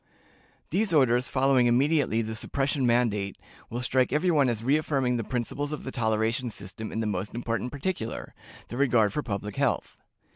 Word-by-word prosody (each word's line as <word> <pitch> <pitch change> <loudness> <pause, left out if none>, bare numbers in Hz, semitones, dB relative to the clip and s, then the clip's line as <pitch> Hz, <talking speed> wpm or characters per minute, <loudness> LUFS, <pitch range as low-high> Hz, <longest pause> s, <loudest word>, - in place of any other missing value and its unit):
These 190 0 +1
orders, 125 -3 +3
following 130 -2 +3
immediately 130 -2 +2
the 110 0 -4
suppression 135 +3 -1
mandate, 105 -5 +1 0.3
will 120 +2 -3
strike 130 0 +2
every 160 +6 +2
one 145 -5 +4
as 115 -2 -2
reaffirming 135 -2 +1
the 115 - -2
principles 130 +5 -3
of 150 - -5
the 130 - -5
toleration 115 +1 0
system 105 +1 -7
in 110 - -2
the - - -1
most 105 +1 -3
important 120 +1 -2
particular 145 -5 -4 0.4
the 120 - -5
regard 120 -7 +3
for 150 - 0
public 105 -4 -4
health. - - 0
125 Hz, 170 wpm, -27 LUFS, 110-140 Hz, 0.4 s, one